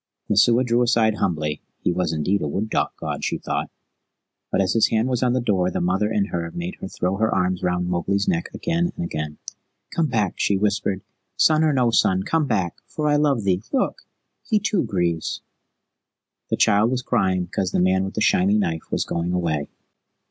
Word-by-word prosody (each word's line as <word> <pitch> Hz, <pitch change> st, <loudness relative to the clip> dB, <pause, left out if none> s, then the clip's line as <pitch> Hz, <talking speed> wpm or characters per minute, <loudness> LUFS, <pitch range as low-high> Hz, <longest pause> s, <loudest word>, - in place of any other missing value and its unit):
Messua 115 Hz, +4 st, +4 dB
drew 120 Hz, -1 st, +2 dB
aside 115 Hz, -3 st, +3 dB
humbly 75 Hz, -6 st, -1 dB, 0.2 s
he -, -, +2 dB
was 90 Hz, -2 st, 0 dB
indeed 80 Hz, +6 st, 0 dB
a 75 Hz, -, -1 dB
wood 100 Hz, +9 st, -3 dB
god, -, -, -2 dB
she -, -, -1 dB
thought; -, -, -3 dB, 0.8 s
but -, -, +1 dB
as 95 Hz, -1 st, +2 dB
his 115 Hz, -, +4 dB
hand 110 Hz, +2 st, +1 dB
was 125 Hz, -2 st, -1 dB
on 125 Hz, -1 st, +2 dB
the 130 Hz, -, +1 dB
door 95 Hz, -7 st, +1 dB
the -, -, -2 dB
mother 95 Hz, +4 st, +1 dB
in 105 Hz, -3 st, +1 dB
her 85 Hz, -1 st, -3 dB
made 85 Hz, +1 st, -4 dB
her -, -, -4 dB
throw 95 Hz, 0 st, -2 dB
her 110 Hz, +1 st, +1 dB
arms 90 Hz, -1 st, 0 dB
round 90 Hz, 0 st, 0 dB
Mowgli's 95 Hz, +3 st, 0 dB
neck 170 Hz, -2 st, 0 dB
again 170 Hz, +1 st, -1 dB
and -, -, -3 dB
again. 75 Hz, -2 st, -4 dB, 0.6 s
"Come 165 Hz, -2 st, +2 dB
back!" 110 Hz, -7 st, 0 dB
she 100 Hz, -, +2 dB
whispered. 100 Hz, -1 st, 0 dB, 0.3 s
"Son 155 Hz, 0 st, +4 dB
or 155 Hz, -, +3 dB
no 125 Hz, -4 st, +2 dB
son, 95 Hz, -4 st, +3 dB
come 160 Hz, +3 st, 0 dB
back, 95 Hz, -8 st, -1 dB
for 150 Hz, -1 st, -2 dB
I 145 Hz, -, +3 dB
love 145 Hz, -6 st, +2 dB
thee 95 Hz, -1 st, +1 dB
Look, 275 Hz, -, 0 dB, 0.4 s
he 220 Hz, -, +1 dB
too 205 Hz, -2 st, +1 dB
grieves." 85 Hz, -4 st, -1 dB, 1.1 s
The -, -, 0 dB
child 105 Hz, +3 st, +4 dB
was 125 Hz, 0 st, -1 dB
crying 95 Hz, -7 st, +1 dB
because 95 Hz, +1 st, -2 dB
the -, -, 0 dB
man 95 Hz, +1 st, +3 dB
with 95 Hz, -, -5 dB
the -, -, -1 dB
shiny 100 Hz, 0 st, +3 dB
knife 80 Hz, -6 st, -2 dB
was -, -, -1 dB
going 85 Hz, +1 st, -2 dB
away. 80 Hz, -5 st, -1 dB
100 Hz, 200 wpm, -23 LUFS, 90-120 Hz, 1.1 s, Messua